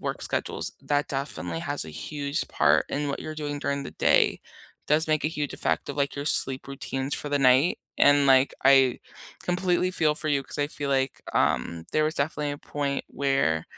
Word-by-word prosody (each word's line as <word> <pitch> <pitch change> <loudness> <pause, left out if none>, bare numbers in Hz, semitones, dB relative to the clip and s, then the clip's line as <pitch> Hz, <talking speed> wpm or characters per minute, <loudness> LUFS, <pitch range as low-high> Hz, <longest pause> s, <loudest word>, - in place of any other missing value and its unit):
work - - -4
schedules, - - 0
that 145 0 0
definitely 90 - -4
has - - -2
a 80 - -9
huge 145 - -3
part 75 0 +3
in 145 +1 -2
what 140 - -3
you're 155 - -6
doing 145 -1 -4
during 140 0 -2
the - - -7
day, - - +3 0.5
does 155 +2 +3
make 155 -1 +1
a - - +3
huge 150 -3 -4
effect - - -1
of, 140 - -5
like, 140 -1 -1
your 140 - -4
sleep 135 -3 +1
routines 135 0 -4
for 145 - -5
the 145 0 +1
night, 135 +5 +4 0.2
and, 145 0 +5
like, 135 0 +5
I 135 -2 +5 0.4
completely 180 0 0
feel 155 -4 +2
for 155 - -6
you, 140 -2 +1
'cause 135 - -4
I 145 - +1
feel 145 -2 -4
like, 135 -1 0
um, 80 +6 0
there 155 - +2
was 155 +1 -1
definitely 145 0 -1
a 145 - -7
point 140 -1 -3
where 135 - 0
140 Hz, 200 wpm, -26 LUFS, 135-150 Hz, 0.5 s, and